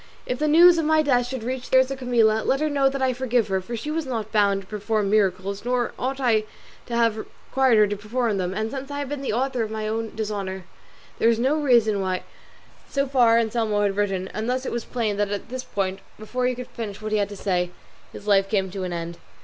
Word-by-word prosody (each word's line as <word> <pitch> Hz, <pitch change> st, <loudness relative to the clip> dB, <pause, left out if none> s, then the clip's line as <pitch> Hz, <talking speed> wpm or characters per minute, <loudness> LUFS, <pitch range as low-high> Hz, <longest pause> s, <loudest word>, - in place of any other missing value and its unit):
If 250 Hz, -, -3 dB
the 305 Hz, -, +1 dB
news 335 Hz, +3 st, +7 dB
of 320 Hz, -, 0 dB
my 310 Hz, 0 st, +4 dB
death 245 Hz, -4 st, +2 dB
should 255 Hz, -2 st, -5 dB
reach 255 Hz, +1 st, -4 dB
the 260 Hz, -, +5 dB
ears 260 Hz, +1 st, +4 dB
of 270 Hz, -, -4 dB
Camilla, 230 Hz, -4 st, +3 dB
let 270 Hz, -, +1 dB
her 305 Hz, 0 st, 0 dB
know 275 Hz, -1 st, +3 dB
that 270 Hz, 0 st, -3 dB
I 260 Hz, -1 st, +2 dB
forgive 245 Hz, -3 st, 0 dB
her, 190 Hz, -1 st, 0 dB
for 235 Hz, +6 st, -6 dB
she 295 Hz, +7 st, -4 dB
was 320 Hz, -2 st, -2 dB
not 225 Hz, -4 st, -3 dB
bound 200 Hz, -2 st, +2 dB
to 190 Hz, -, -17 dB
perform 210 Hz, 0 st, -1 dB
miracles, 195 Hz, -1 st, +1 dB
nor 245 Hz, 0 st, 0 dB
ought 265 Hz, +2 st, -2 dB
I 225 Hz, -5 st, +2 dB, 0.4 s
to 235 Hz, -, -3 dB
have 230 Hz, -2 st, +2 dB
required 260 Hz, +2 st, 0 dB
her 210 Hz, -, +6 dB
to 205 Hz, 0 st, -2 dB
perform 215 Hz, +1 st, -1 dB
them; 180 Hz, -1 st, -1 dB
and 215 Hz, +3 st, -3 dB
since 270 Hz, 0 st, -6 dB
I 285 Hz, -, -5 dB
have 285 Hz, -2 st, -3 dB
been 290 Hz, -1 st, -4 dB
the 275 Hz, -, -2 dB
author 255 Hz, +2 st, 0 dB
of 220 Hz, -, -2 dB
my 215 Hz, 0 st, -3 dB
own 225 Hz, 0 st, -3 dB
dishonour, 200 Hz, -3 st, -4 dB, 0.6 s
there 230 Hz, -, +4 dB
is 230 Hz, -, +3 dB
no 260 Hz, +5 st, +2 dB
reason 235 Hz, -9 st, +3 dB
why 185 Hz, -1 st, -2 dB, 0.3 s
" -, -, -27 dB
So 275 Hz, 0 st, 0 dB
far 245 Hz, -4 st, +4 dB
Anselmo 220 Hz, -2 st, +1 dB
had 200 Hz, -1 st, +1 dB
written, 195 Hz, -2 st, -1 dB
and 220 Hz, +2 st, -4 dB
thus 255 Hz, +1 st, -1 dB
it -, -, -3 dB
was 235 Hz, -1 st, -3 dB
plain 220 Hz, -5 st, -2 dB
that 205 Hz, -1 st, 0 dB
at 205 Hz, +2 st, -4 dB
this 255 Hz, +1 st, -5 dB
point, 195 Hz, -3 st, -2 dB, 0.2 s
before 250 Hz, +4 st, -2 dB
he 255 Hz, -, 0 dB
could 250 Hz, 0 st, -8 dB
finish 210 Hz, -4 st, -6 dB
what 215 Hz, 0 st, -5 dB
he 215 Hz, -, +2 dB
had 200 Hz, 0 st, 0 dB
to 205 Hz, -, -8 dB
say, 180 Hz, -2 st, 0 dB, 0.4 s
his 205 Hz, -, -11 dB
life 195 Hz, -2 st, +3 dB
came 195 Hz, -3 st, 0 dB
to 190 Hz, 0 st, -4 dB
an 180 Hz, -, -3 dB
end. 170 Hz, 0 st, -5 dB
225 Hz, 255 wpm, -24 LUFS, 205-255 Hz, 0.6 s, news